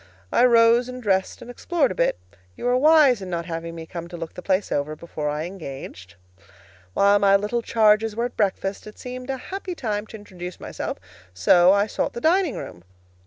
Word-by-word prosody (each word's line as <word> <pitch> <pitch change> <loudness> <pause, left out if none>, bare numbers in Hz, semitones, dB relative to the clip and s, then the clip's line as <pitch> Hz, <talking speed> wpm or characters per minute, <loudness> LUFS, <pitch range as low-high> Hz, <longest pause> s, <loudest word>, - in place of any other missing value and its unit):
I 245 - +4
rose 235 0 +5
and 250 0 -7
dressed 195 -3 -1
and 240 - -9
explored 290 +2 0
a - - -2
bit. 170 - +1 0.4
You - - -6
were 245 0 +3
wise 285 -4 +5
in 190 - -6
not 170 -1 -3
having 165 0 -5
me 165 -1 -7
come 170 0 -7
to 175 0 -9
look 165 -1 -7
the - - -8
place 190 +2 0
over 145 +2 -1
before 155 -2 -5
I 150 +1 -2
engaged. 135 - -9 0.8
While 200 +1 +4
my 200 -1 +5
little 210 +4 0
charges 220 -1 +3
were 235 +1 -1
at 245 - -6
breakfast, 195 -1 -1
it 210 - -12
seemed 255 +1 -8
a 265 - -2
happy 375 +5 -6
time 215 -6 -3
to 220 - -9
introduce 180 -4 -9
myself; - - -5 0.4
so 175 - +5
I 200 +1 +3
sought 215 - -3
the - - -5
dining 335 +1 +2
room. 85 - -9
205 Hz, 205 wpm, -23 LUFS, 175-245 Hz, 0.8 s, rose